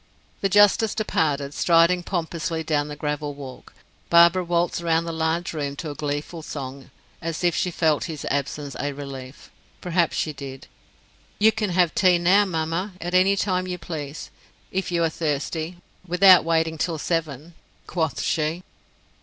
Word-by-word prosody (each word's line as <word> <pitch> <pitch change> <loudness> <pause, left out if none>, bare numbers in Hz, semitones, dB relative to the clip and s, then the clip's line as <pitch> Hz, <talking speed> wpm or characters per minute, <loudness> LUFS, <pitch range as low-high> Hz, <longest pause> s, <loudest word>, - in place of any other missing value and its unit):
The 195 - +1
justice 205 +2 +4
departed, 145 -9 0
striding 170 +2 +4
pompously 170 -2 -3
down 150 -2 0
the 150 - -6
gravel 150 0 -3
walk. 135 -3 -11 0.3
Barbara 170 +2 +6
waltzed 175 0 0
round 165 -1 +1
the 165 - -3
large 160 +2 -1
room 145 -3 -3
to 155 +1 -5
a - - -5
gleeful 145 +3 -4
song, 135 -3 -7 0.3
as 165 +1 -4
if 175 -2 +2
she 180 - 0
felt 160 -3 +1
his 160 -4 -6
absence 145 0 -3
a 145 0 -2
relief. 135 -1 -9 0.3
Perhaps 175 -2 0
she 155 - -1
did. 135 -2 -9 0.7
"You 220 +2 +5
can 215 -2 -2
have 175 -2 +2
tea 185 -3 +4
now, 185 +4 +4
mamma, 165 +2 -2
at 175 +1 -5
any 185 +2 +4
time 185 -2 0
you 180 -1 -3
please, 155 -4 -7 0.4
if 190 -1 -2
you 170 -1 +1
are 165 - +2
thirsty, 160 +2 -3 0.3
without 180 +1 +7
waiting 160 -1 0
till 165 0 -1
seven," 160 -1 -3 0.3
quoth 160 -6 -2
she. 160 +3 -1
165 Hz, 160 wpm, -24 LUFS, 150-180 Hz, 0.7 s, without